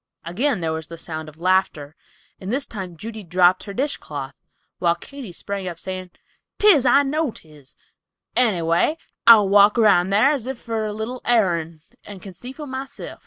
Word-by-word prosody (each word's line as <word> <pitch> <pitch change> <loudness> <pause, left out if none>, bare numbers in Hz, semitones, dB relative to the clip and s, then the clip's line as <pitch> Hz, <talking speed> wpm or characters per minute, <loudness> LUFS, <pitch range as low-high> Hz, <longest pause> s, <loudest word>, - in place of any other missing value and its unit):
Again 215 - -1
there 160 -1 -1
was 160 0 -5
the 165 - -9
sound 160 -1 -6
of 155 - -18
laughter, 175 -5 0 0.4
and 190 +2 -5
this 275 +3 0
time 185 -5 -8
Judy 220 +4 -7
dropped 180 +1 +3
her 200 - -7
dishcloth, 145 - -4 0.5
while 170 -1 +2
Katy 260 +3 -10
sprang 195 +2 -5
up, 175 -2 -5
saying, 185 +1 -6 0.5
"'Tis, 335 -12 +5
I 280 +4 +5
know 300 +2 -1
'tis; 150 - -14 0.6
any 215 -9 +2
way, 170 - +1 0.3
I'll 220 -4 +8
walk 205 +2 +5
round 200 -5 +4
thar 215 +8 +4
as 265 -5 -3
if 265 -1 -4
for 225 -2 -3
a - - -3
little 220 +4 -5
airin', 170 -9 0 0.2
and 205 -2 -10
can 190 0 -10
see 245 +9 -8
for 295 +3 -9
myself." 265 0 -7
200 Hz, 180 wpm, -22 LUFS, 170-245 Hz, 0.6 s, I'll